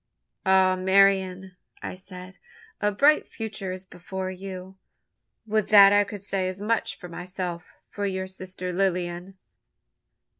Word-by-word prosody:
"Ah, 190 -1 +5
Marian," 190 0 +2 0.3
I - - -4
said, 185 0 -11 0.5
"a 210 - +2
bright 290 +9 +4
future 205 -4 -6
is 185 +1 -7
before 185 +1 -6
you. 190 0 -8 0.7
Would 215 -1 0
that 200 -2 +8
I 205 0 +5
could 200 -1 -8
say 195 -2 -1
as 185 +1 -7
much 220 +2 -1
for 180 - -9
myself 175 0 -5 0.2
for 205 -1 -4
your 190 -1 -2
sister 185 -1 -7
Lilian!" 180 0 -1
190 Hz, 135 wpm, -26 LUFS, 185-200 Hz, 0.7 s, that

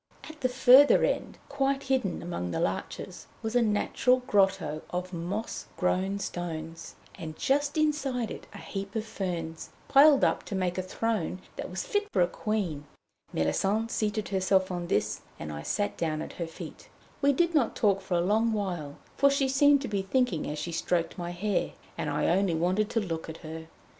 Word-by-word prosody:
At 315 -1 -11
the 255 - +2
further 260 +2 +7
end, - - -1
quite 275 0 0
hidden 260 -8 0
among 170 - -3
the 85 - -2
larches, - - -3 0.2
was 220 +2 -3
a 245 - +5
natural 240 +3 +2
grotto 190 -8 +2
of 180 +1 -4
moss 180 +6 -4
grown 190 +2 +1
stones, 165 -3 -5 0.2
and 160 -3 -6
just 285 +2 +1
inside 285 -6 0
it - - -8
a - - -10
heap 195 +1 -6
of 220 -1 -1
ferns, 175 -7 -4 0.2
piled 285 0 +7
up - - +3
to 205 - -4
make 185 -1 -1
a - - +1
throne 185 -1 -2 0.2
that - - -5
was - - -4
fit 415 -4 0
for 180 - +4
a - - +2
queen. 180 -8 -2 0.5
Méllisande 205 - 0
seated 215 0 -1
herself 190 -1 +2
on 175 -1 -3
this, 105 - 0 0.2
and 75 0 -6
I 75 - -5
sat 205 - -1
down 155 -2 -1
at - - -8
her 170 - -1
feet. 165 - -10 0.3
We 280 0 +5
did 340 +5 +2
not 280 -8 +2
talk 200 -3 +2
for 190 -1 -2
a - - +2
long 220 +5 +2
while, 175 -9 -3 0.2
for 280 - +6
she 275 -1 +2
seemed 280 +1 +4
to - - -2
be 205 -3 -1
thinking 195 - 0
as 150 - -4
she 155 +3 -4
stroked 170 0 0
my 175 0 -3
hair, 190 +3 -1 0.2
and - - -2
I - - 0
only 180 0 +2
wanted 185 +6 +1
to 235 - +1
look 165 -5 -4
at 160 - -7
her. 160 +1 -7
195 Hz, 190 wpm, -28 LUFS, 170-250 Hz, 0.5 s, further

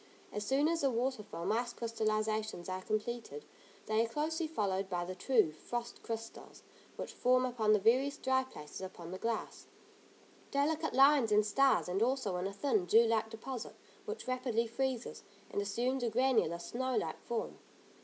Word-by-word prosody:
As 210 - -2
soon 270 +8 +2
as 330 0 +1
the 275 - +3
water 250 0 0
film 185 -2 -4
ice 240 +2 0
crystallisations 215 -4 -1
are 185 0 -3
completed 235 - -3 0.4
they 220 +1 +2
are 230 - -3
closely 315 +5 -1
followed 195 -9 -1
by 175 -1 -1
the 185 - -5
true 215 -2 +3
frost 235 +9 -5
crystals, 225 -1 -7 0.3
which - - -6
form 255 +1 +3
upon 235 -4 +1
the 215 - +6
various 255 +7 +3
dry 260 0 +2
places 150 - -10
upon 180 -2 -7
the 185 - -6
glass, 230 -1 -3 0.8
delicate 310 +2 0
lines 270 -4 +6
and 210 0 +5
stars 270 +5 +3
and 185 +3 -1
also 245 -5 +1
in 180 +2 -1
a - - -4
thin, 215 -2 +1
dew 225 +6 +7
like 225 -1 +1
deposit, 230 +2 -6 0.3
which 435 - -6
rapidly 250 -2 0
freezes, 250 +1 -2 0.3
and 205 - 0
assumes 240 +6 -1
a 240 - +1
granular, 245 -6 +2
snow 255 +8 -2
like - - -2
form. 235 -1 -4
230 Hz, 170 wpm, -34 LUFS, 210-260 Hz, 0.8 s, dew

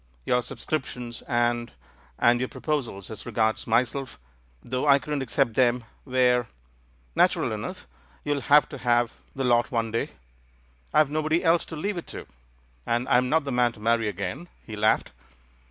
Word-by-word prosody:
Your 125 0 +2
subscriptions, 125 -1 -4
and 120 0 0 0.2
— 60 -1 -30
and 120 +1 +4
your 130 - -2
proposals 120 - -3
as 110 - -8
regards 110 -1 0
myself, 125 +3 0 0.5
though 130 +4 -2
I 140 -1 +7
couldn't 140 +1 -3
accept 135 -1 +1
them, 125 0 +2 0.2
were 125 -2 +2 0.3
" - - -35
"Natural - - +3
enough! - - -5 0.4
You'll 145 -1 -1
have 145 +3 +5
to - - -8
have 120 -1 +2 0.2
the 135 - -2
lot 120 -2 +3
one 115 -2 -1
day 115 - -1 0.4
— - - -34
I've 150 -2 +4
nobody 155 +3 +1
else 165 0 +3
to 160 - -8
leave 185 +4 -2
it - - -11
to, - - -8 0.6
and 120 +2 0
I'm 125 +1 +3
not 160 +2 +3
the 140 - -4
man 125 -1 +2
to - - -15
marry 115 0 +2
again." 100 - -4 0.2
He 110 - -7
laughed. 105 +1 +2
120 Hz, 170 wpm, -26 LUFS, 115-140 Hz, 0.6 s, I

